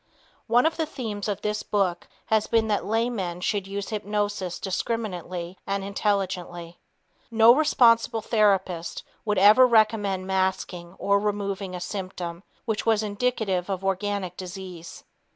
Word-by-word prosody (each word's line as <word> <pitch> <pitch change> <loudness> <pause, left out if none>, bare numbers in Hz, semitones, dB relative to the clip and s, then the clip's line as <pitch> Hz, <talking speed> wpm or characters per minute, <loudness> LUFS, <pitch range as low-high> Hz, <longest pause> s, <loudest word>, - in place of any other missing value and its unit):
One 240 +3 +4
of 320 - +1
the 320 -1 -1
themes 220 -9 -5
of 205 -2 -2
this 210 0 -1
book 185 -4 -1 0.2
has 220 -1 +1
been 225 -1 +2
that 205 - 0
laymen 220 -6 -1
should 200 0 -1
use 200 0 -4
hypnosis 205 -3 -2
discriminately 185 -3 -3
and 195 0 -1
intelligently. 185 -4 -2 0.5
No 230 0 +7
responsible 235 -6 +4
therapist 195 -6 +1 0.2
would 210 -2 0
ever 210 +7 +7
recommend 215 -5 +2
masking 185 -2 -2
or 200 0 +2
removing 200 -2 -2
a - - -4
symptom 180 -2 -5 0.2
which 220 -3 -1
was 220 -1 +2
indicative 205 -4 -1
of 195 -1 -3
organic 195 -1 -1
disease. 180 -2 -8
200 Hz, 135 wpm, -25 LUFS, 185-220 Hz, 0.5 s, No